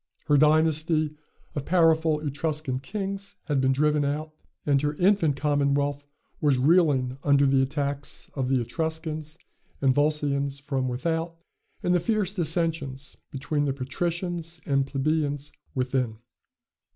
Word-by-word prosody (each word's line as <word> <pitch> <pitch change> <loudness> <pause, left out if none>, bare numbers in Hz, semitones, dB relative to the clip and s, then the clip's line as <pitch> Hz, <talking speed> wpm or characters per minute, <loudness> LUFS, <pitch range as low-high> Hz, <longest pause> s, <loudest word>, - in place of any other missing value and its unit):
Her 150 - +3
dynasty 155 +1 +3 0.4
of 145 - -3
powerful 160 -3 +3
Etruscan 150 -2 -2
kings 195 +5 -5
had 145 -4 0
been 130 0 +3
driven 150 +2 +2
out; 150 +2 -2 0.3
and 140 -2 +3
her 150 0 -1
infant 180 -4 +3
commonwealth 145 0 +1 0.3
was 145 -4 +3
reeling 135 -3 +3
under 140 -1 +4
the 135 -1 +4
attacks 140 0 -3
of 130 -3 -2
the 130 -1 +3
Etruscans 160 +2 -4 0.4
and 135 -2 +3
Volscians 140 -1 +1
from 135 -2 -2
without, 165 +6 -2 0.5
and 180 - +2
the 180 - +4
fierce 205 0 0
dissensions 160 -6 -2
between 145 +1 -1
the 135 - 0
patricians 170 +5 -3
and 135 -2 +1
plebeians 145 0 -1 0.2
within. 125 -3 -1
150 Hz, 125 wpm, -26 LUFS, 140-160 Hz, 0.5 s, under